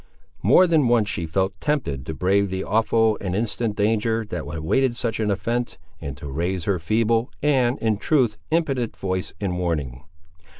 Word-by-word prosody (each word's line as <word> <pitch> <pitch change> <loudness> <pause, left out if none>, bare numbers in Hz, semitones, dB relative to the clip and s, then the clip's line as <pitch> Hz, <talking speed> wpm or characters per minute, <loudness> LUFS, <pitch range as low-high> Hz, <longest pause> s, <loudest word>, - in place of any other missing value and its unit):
More 135 - +6
than 160 -7 +3
once 115 -3 +3
she 85 -2 -2
felt 95 +4 0
tempted 95 - -2
to 80 - -4
brave 100 +5 +2
the 95 0 -3
awful 110 0 +2
and 95 -2 -2
instant 110 0 -1
danger 110 +2 +1
that 85 - -2
awaited 80 - 0
such 115 0 -2
an 110 -1 0
offence, 120 +4 -1 0.2
and 70 -4 -6
to 75 - -8
raise 85 +6 -2
her 95 -1 0
feeble, 115 +7 +1
and, 130 -4 +2
in 110 -2 0
truth, 120 -4 +1
impotent 140 -8 0
voice 95 -3 -3
in 90 -3 -2
warning. 75 -8 -2
105 Hz, 170 wpm, -23 LUFS, 90-120 Hz, 0.2 s, More